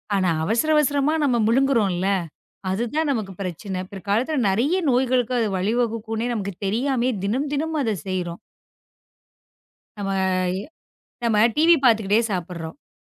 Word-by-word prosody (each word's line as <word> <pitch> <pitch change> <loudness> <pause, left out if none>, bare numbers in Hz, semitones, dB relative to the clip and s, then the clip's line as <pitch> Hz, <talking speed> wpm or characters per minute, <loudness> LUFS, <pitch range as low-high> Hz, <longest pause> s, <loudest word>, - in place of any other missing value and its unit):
ஆனா 185 -2 +2
அவசர 230 - +1
அவசரமா 290 0 +2
நாம 250 -4 +2
முழுங்குறோம்ல, 225 -8 +2 0.6
அது 195 +5 0
தான் 315 -2 +1
நமக்குப் 200 -7 -4
பிரச்சனை, 185 +1 -4
பிற்காலத்துல 210 - -1
நிறைய 245 - +1 0.2
நோய்களுக்கு 250 -1 +1
அது 225 - +1
வழி 195 +5 0
வகுக்கும்னே 225 -1 -2
நமக்குத் 200 -3 -5
தெரியாமயே 250 +4 0
தினம் 260 +8 -1
தினம் 315 +3 -1
அதைச் 215 - -2
செய்றோம். 180 -2 -3 1.6
நாம 200 -1 -3 1.1
நாம 225 -3 +2 0.2
டிவி 330 +3 +6
பாத்துக்கிட்டே 220 -3 +4
சாப்பிடுறோம்.அ 175 - -6
225 Hz, 120 wpm, -23 LUFS, 195-265 Hz, 1.6 s, டிவி